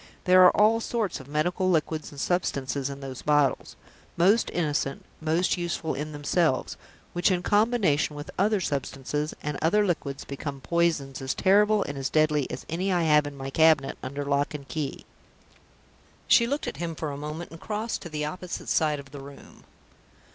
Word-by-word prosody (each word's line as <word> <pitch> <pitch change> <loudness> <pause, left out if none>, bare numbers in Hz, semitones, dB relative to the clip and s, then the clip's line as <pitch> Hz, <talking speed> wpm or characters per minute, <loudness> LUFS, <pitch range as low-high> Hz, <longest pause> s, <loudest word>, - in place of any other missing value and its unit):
There 185 0 +7
are 180 - +6
all 220 +2 +5
sorts 225 -5 -2
of 135 - -12
medical 170 +5 0
liquids 160 -2 0
and 145 - -11
substances 140 -5 -1
in 140 0 -7
those 130 -2 -7
bottles 145 -2 +1 0.4
most 200 +7 +4
innocent, 150 -4 -1
most 165 +4 +1
useful 170 -2 -2
in 150 +2 -4
themselves 145 0 0 0.4
which, 175 +3 +2
in 180 -2 0
combination 205 -9 +2
with 145 0 -7
other 205 +2 +2
substances 145 0 -3
and 150 -1 -3
other 205 +6 +3
liquids, 145 -6 -3
become 140 0 -6
poisons 155 -4 0
as 130 0 -2
terrible 205 +2 +4
and 140 -1 -6
as 135 - -2
deadly 155 -3 +2
as 125 - -6
any 180 +4 -2
that 185 - +2
I 170 - +1
have 150 -2 +4
in 145 -1 -8
my 135 0 -5
cabinet 155 -3 +4
under 140 +2 -5
lock 140 +1 0
and 140 -2 -8
key." 150 -4 -4 1.2
She 235 - +5
looked 285 +4 -2
at - - -5
him 165 0 -4
for 155 -1 -4
a - - -5
moment, 150 +4 -6
and 165 - -10
creased 220 +2 -3
to 170 - -8
the 150 -1 -3
opposite 180 +3 -6
side 150 -3 +2
of 140 -1 -12
the 140 -1 -8
room. 140 0 -14
155 Hz, 185 wpm, -26 LUFS, 140-180 Hz, 1.2 s, There